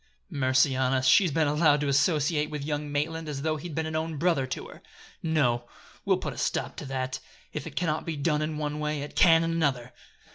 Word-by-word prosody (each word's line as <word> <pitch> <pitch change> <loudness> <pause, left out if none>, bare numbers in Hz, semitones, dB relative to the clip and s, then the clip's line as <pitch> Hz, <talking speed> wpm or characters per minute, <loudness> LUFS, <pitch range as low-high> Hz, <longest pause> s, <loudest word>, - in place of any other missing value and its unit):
Mercy 130 0 +2
on 130 0 +1
us! 130 -1 +1
she's 185 +6 +6
been 155 +1 +1
allowed 150 0 +3
to 145 - -1
associate 150 +1 +2
with 150 -2 -5
young 150 -1 -3
Maitland 160 +2 -2
as 140 -1 -4
though 155 0 0
he'd 160 0 -7
been 160 0 -1
an 160 0 -4
own 160 0 -2
brother 150 -4 +1
to 130 - -5
her! - - -13 0.4
No! 125 -7 +1 0.4
we'll - - +3
put - - -4
a - - -8
stop - - -1
to - - -6
that. 130 -1 -3 0.3
If - - -5
it - - -9
can 180 - 0
not 155 -1 -1
be 165 -2 -4
done 150 +1 +1
in 155 0 -2
one 150 0 -3
way, 150 -1 -2
it 145 - -9
can 165 -2 +6
in 165 - -1
another!" 135 -7 -1
150 Hz, 230 wpm, -27 LUFS, 140-160 Hz, 0.4 s, she's